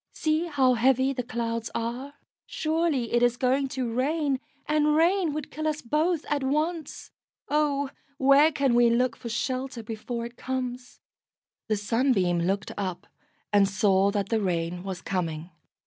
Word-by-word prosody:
See 315 Hz, +2 st, 0 dB
how 270 Hz, -5 st, +3 dB
heavy 260 Hz, +3 st, +3 dB
the 250 Hz, -, -2 dB
clouds 230 Hz, -1 st, -3 dB
are! 245 Hz, +5 st, -4 dB, 0.3 s
Surely 310 Hz, -7 st, -1 dB
it 240 Hz, -, +3 dB
is 245 Hz, 0 st, +3 dB
going 265 Hz, +2 st, +1 dB
to 255 Hz, -3 st, -3 dB
rain, 280 Hz, +2 st, 0 dB, 0.3 s
and 300 Hz, 0 st, +2 dB
rain 345 Hz, +1 st, +3 dB
would 300 Hz, -1 st, -5 dB
kill 310 Hz, +1 st, -3 dB
us 310 Hz, 0 st, -2 dB
both 310 Hz, +6 st, 0 dB
at 290 Hz, -1 st, 0 dB
once. 305 Hz, +3 st, -2 dB, 0.4 s
Oh, 285 Hz, -2 st, +1 dB, 0.3 s
where 280 Hz, +3 st, +5 dB
can 275 Hz, -4 st, +1 dB
we 240 Hz, 0 st, +5 dB
look 235 Hz, 0 st, +2 dB
for 235 Hz, -, -8 dB
shelter 255 Hz, +1 st, -3 dB
before 230 Hz, +2 st, -5 dB
it 235 Hz, +1 st, -10 dB
comes?" 255 Hz, -1 st, -5 dB, 0.7 s
The 215 Hz, -, +1 dB
Sunbeam 205 Hz, -5 st, +1 dB
looked 195 Hz, +4 st, -1 dB
up, 185 Hz, -1 st, -3 dB, 0.5 s
and 200 Hz, -1 st, +5 dB
saw 195 Hz, 0 st, +3 dB
that 200 Hz, -1 st, -2 dB
the 225 Hz, -2 st, +1 dB
rain 175 Hz, -2 st, -1 dB
was 185 Hz, -1 st, -6 dB
coming. 170 Hz, -2 st, -3 dB
250 Hz, 155 wpm, -27 LUFS, 220-290 Hz, 0.7 s, where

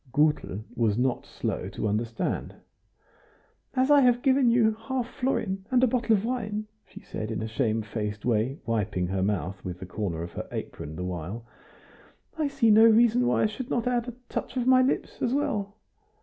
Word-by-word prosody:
Gutel 145 Hz, -8 st, +1 dB
was 110 Hz, -3 st, +1 dB
not 125 Hz, 0 st, 0 dB
slow -, -, -3 dB
to -, -, -3 dB
understand. 115 Hz, +2 st, -2 dB, 1.2 s
"As 260 Hz, +2 st, +3 dB
I 290 Hz, -1 st, +7 dB
have 245 Hz, -1 st, +3 dB
given 265 Hz, -2 st, +4 dB
you 235 Hz, -2 st, +4 dB
a 225 Hz, -, -21 dB
half 260 Hz, -3 st, -1 dB
florin 225 Hz, -8 st, -2 dB
and 255 Hz, -1 st, +3 dB
a -, -, +6 dB
bottle 235 Hz, -2 st, +2 dB
of 200 Hz, +1 st, -1 dB
wine," 215 Hz, -4 st, -2 dB, 0.2 s
she -, -, -12 dB
said, 110 Hz, -, -5 dB
in 110 Hz, -, -3 dB
a -, -, -3 dB
shamefaced 110 Hz, -3 st, -2 dB
way, 120 Hz, +3 st, +1 dB
wiping 105 Hz, -5 st, -1 dB
her 95 Hz, 0 st, -1 dB
mouth 95 Hz, -1 st, -2 dB
with 90 Hz, -1 st, -5 dB
the 95 Hz, -, -7 dB
corner 90 Hz, -3 st, -3 dB
of 85 Hz, -, -7 dB
her -, -, -6 dB
apron 75 Hz, +2 st, -6 dB
the 90 Hz, -, -4 dB
while, 90 Hz, +6 st, -5 dB, 0.9 s
"I 310 Hz, -2 st, 0 dB
see 275 Hz, -6 st, +3 dB
no 220 Hz, +2 st, +8 dB
reason 235 Hz, +2 st, +5 dB
why -, -, +2 dB
I -, -, +4 dB
should 235 Hz, +4 st, -4 dB
not 240 Hz, -, 0 dB
add 245 Hz, -1 st, 0 dB
a 245 Hz, -, -6 dB
touch -, -, -4 dB
of 245 Hz, -, 0 dB
my 255 Hz, 0 st, +6 dB
lips 255 Hz, -, -1 dB
as 250 Hz, +2 st, +1 dB
well." 205 Hz, -8 st, -1 dB
200 Hz, 190 wpm, -27 LUFS, -, 1.2 s, no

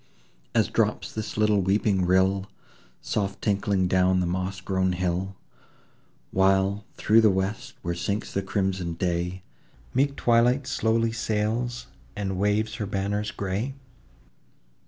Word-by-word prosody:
As -, -, +4 dB
drops -, -, 0 dB
this 110 Hz, -1 st, -5 dB
little 105 Hz, -2 st, +3 dB
weeping 95 Hz, -1 st, +2 dB
rill, 95 Hz, +2 st, +2 dB, 0.5 s
Soft 100 Hz, -2 st, -2 dB
tinkling 100 Hz, -2 st, +1 dB
down 95 Hz, 0 st, +3 dB
the 90 Hz, -, +1 dB
moss 95 Hz, +2 st, -2 dB
grown 95 Hz, 0 st, 0 dB
hill; 90 Hz, +2 st, -2 dB, 1.0 s
While, 95 Hz, +2 st, +2 dB
through 110 Hz, +1 st, +4 dB
the 110 Hz, -, +6 dB
west, 105 Hz, +7 st, -2 dB
where 85 Hz, -1 st, -1 dB
sinks 100 Hz, +5 st, -3 dB
the 100 Hz, -, 0 dB
crimson 95 Hz, -3 st, -1 dB
day, 90 Hz, +1 st, -2 dB, 0.5 s
Meek 140 Hz, +2 st, +2 dB
Twilight 120 Hz, +3 st, +3 dB
slowly 115 Hz, -2 st, +1 dB
sails, 115 Hz, +2 st, -1 dB, 0.3 s
and 95 Hz, -2 st, -3 dB
waves 105 Hz, +2 st, +1 dB
her 105 Hz, -, -3 dB
banners 100 Hz, +2 st, -1 dB
grey? 100 Hz, +8 st, -3 dB
100 Hz, 125 wpm, -26 LUFS, 95-110 Hz, 1.0 s, the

